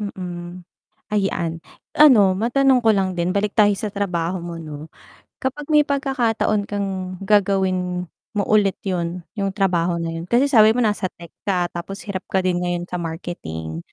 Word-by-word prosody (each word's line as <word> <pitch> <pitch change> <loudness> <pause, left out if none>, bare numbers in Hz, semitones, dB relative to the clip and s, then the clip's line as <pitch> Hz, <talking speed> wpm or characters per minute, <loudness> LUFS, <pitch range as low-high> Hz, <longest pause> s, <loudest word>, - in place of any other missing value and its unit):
Mm, 180 -3 -6 0.5
ayan, 170 -5 -1 0.3
ano 225 -11 +6
matanong 250 +5 +3
ko 225 - +1
lang 190 -1 +1
din 175 0 -1
balik 205 0 0
tayo 205 -2 +4
sa 210 -1 -4
trabaho 180 -3 -2
mo 170 0 -6
'no. 155 -1 -8 0.5
Kapag 275 +3 -3
may 300 - +7
pagkakataon 250 -7 0
kang 200 -1 -2 0.4
gagawin 185 -3 +1 0.3
mo 205 - +2
ulit 205 -3 +4
yun 175 -2 -2 0.2
yung 195 -1 -1
trabaho 180 -4 +1
na 165 -1 -3
yun, 165 +1 -6
kasi 245 +3 +4
sabi 220 -3 +6
mo 250 - +2
nasa 205 -2 0
tech 170 -2 -12 0.2
ka 180 -2 +1
tapos 195 +3 -6
hirap 195 -3 -5
ka 190 -1 +1
din 180 -1 +1
ngayon 175 -1 -1
sa 180 - -3
marketing 80 - -5
190 Hz, 165 wpm, -21 LUFS, 175-210 Hz, 0.5 s, may